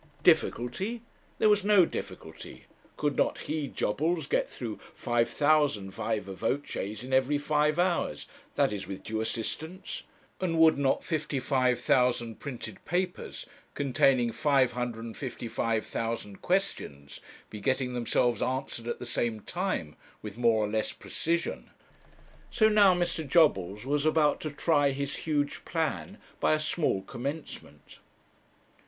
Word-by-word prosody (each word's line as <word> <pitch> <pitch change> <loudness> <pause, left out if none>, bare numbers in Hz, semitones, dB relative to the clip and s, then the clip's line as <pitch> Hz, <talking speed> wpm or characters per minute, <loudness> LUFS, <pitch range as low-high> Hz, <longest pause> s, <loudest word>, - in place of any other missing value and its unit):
Difficulty! 195 - +2 0.3
There - - +4
was 210 -1 +4
no 200 -3 +6
difficulty. - - -8 0.3
Could 145 -1 0
not - - +1
he, 150 -1 -2
Jobbles, 160 +9 -1
get - - 0
through 115 -4 -6 0.2
5,000 120 -2 +2
viva 105 -1 -3
voces 115 -1 -3
in 130 +1 -6
every 135 +2 +3
five 150 +1 +1
hours 175 -1 0 0.3
that - - +2
is, 100 - -5
with 95 0 -7
due 110 0 -2
assistance? 160 - -4 0.4
and 170 -3 0
would 160 -1 +7
not 135 -1 +2
55,000 130 -6 +1
printed 120 -7 -7
papers, 180 +2 -3 0.3
containing 130 -3 +3
555,000 115 -4 -1
questions, 125 - -2 0.3
be 105 - -6
getting 130 0 0
themselves 120 -1 +1
answered 130 -3 -2
at - - -2
the - - -7
same 120 -2 -1
time, 175 - -3 0.3
with 105 -2 -6
more 115 -2 +3
or - - -2
less 110 +1 0
precision? 170 +1 -2 0.8
So 220 -1 +4
now 205 -3 +6
Mr. 170 -3 -1
Jobbles 105 - +3
was 145 +2 +1
about 155 -2 +3
to 155 - -2
try 145 -1 +2
his 140 +1 -3
huge 145 -2 0
plan 165 +4 -2 0.2
by - - +3
a - - -1
small 155 - 0
commencement. 140 +8 -7
135 Hz, 125 wpm, -29 LUFS, 115-160 Hz, 0.8 s, would